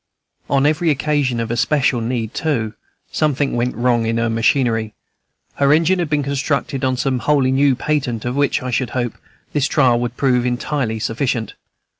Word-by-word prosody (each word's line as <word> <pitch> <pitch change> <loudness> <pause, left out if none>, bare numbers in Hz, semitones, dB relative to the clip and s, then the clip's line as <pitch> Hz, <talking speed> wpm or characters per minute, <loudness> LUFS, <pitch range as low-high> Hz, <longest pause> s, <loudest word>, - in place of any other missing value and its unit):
On 140 0 +2
every 155 +3 +2
occasion 145 -4 0
of 115 -1 -3
especial 130 +1 +1
need, 115 -1 -3
too, 120 -9 -1 0.4
something 145 -3 0
went 120 +1 -1
wrong 120 -1 +1
in 115 0 0
her 115 0 0
machinery, 115 -1 +1 0.6
her 140 0 +3
engine 165 +4 +3
being 150 -1 0
constructed 140 0 -2
on 130 -1 +1
some 130 -1 0
wholly 135 +1 +2
new 135 0 +3
patent, 130 -5 -2
of 120 +1 -2
which, 140 -2 +1
I 130 - -3
should 125 +1 0
hope, 120 -3 -1 0.4
this 145 -1 +1
trial 125 -6 +3
would 120 0 -4
prove 125 -3 +2
entirely 125 -1 -1
sufficient. 115 +1 -2
130 Hz, 165 wpm, -19 LUFS, 120-145 Hz, 0.6 s, her